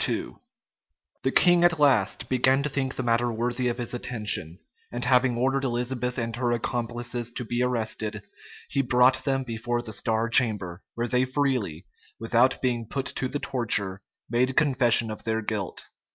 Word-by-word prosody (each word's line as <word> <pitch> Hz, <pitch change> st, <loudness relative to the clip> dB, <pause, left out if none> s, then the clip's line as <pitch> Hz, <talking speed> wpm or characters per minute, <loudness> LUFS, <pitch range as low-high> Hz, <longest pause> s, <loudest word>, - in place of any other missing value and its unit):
87 -, -, -1 dB, 0.9 s
The -, -, 0 dB
king 175 Hz, -1 st, +5 dB
at 175 Hz, -2 st, +4 dB
last 130 Hz, -9 st, +2 dB
began 130 Hz, +2 st, +3 dB
to 150 Hz, -, -1 dB
think 135 Hz, -2 st, -2 dB
the 130 Hz, -, -2 dB
matter 120 Hz, 0 st, +1 dB
worthy 120 Hz, +2 st, -1 dB
of 120 Hz, 0 st, -1 dB
his 120 Hz, -1 st, -3 dB
attention; 105 Hz, -9 st, -2 dB, 0.3 s
and 120 Hz, 0 st, -2 dB
having 125 Hz, -1 st, +3 dB
ordered 135 Hz, +2 st, +1 dB
Elizabeth 125 Hz, 0 st, -1 dB
and 115 Hz, -2 st, -2 dB
her 120 Hz, -1 st, 0 dB
accomplices 120 Hz, 0 st, -2 dB
to 125 Hz, -, -5 dB
be 120 Hz, +2 st, -2 dB
arrested, 110 Hz, -4 st, -2 dB, 0.4 s
he 140 Hz, -, 0 dB
brought 125 Hz, 0 st, +3 dB
them 135 Hz, -1 st, 0 dB
before 120 Hz, 0 st, -3 dB
the 110 Hz, -2 st, -7 dB
star 110 Hz, +2 st, 0 dB
chamber, 105 Hz, -7 st, +2 dB
where 120 Hz, +1 st, -1 dB
they 125 Hz, +2 st, +2 dB
freely, 130 Hz, -, -1 dB, 0.3 s
without 120 Hz, +4 st, +2 dB
being 120 Hz, -3 st, -1 dB
put 135 Hz, +3 st, -3 dB
to 130 Hz, -, -2 dB
the 145 Hz, -, -3 dB
torture 110 Hz, -9 st, -1 dB, 0.3 s
made 125 Hz, +3 st, 0 dB
confession 125 Hz, -6 st, +3 dB
of 110 Hz, -, -7 dB
their 110 Hz, 0 st, -1 dB
guilt. 105 Hz, -3 st, -4 dB
120 Hz, 165 wpm, -26 LUFS, 115-130 Hz, 0.9 s, king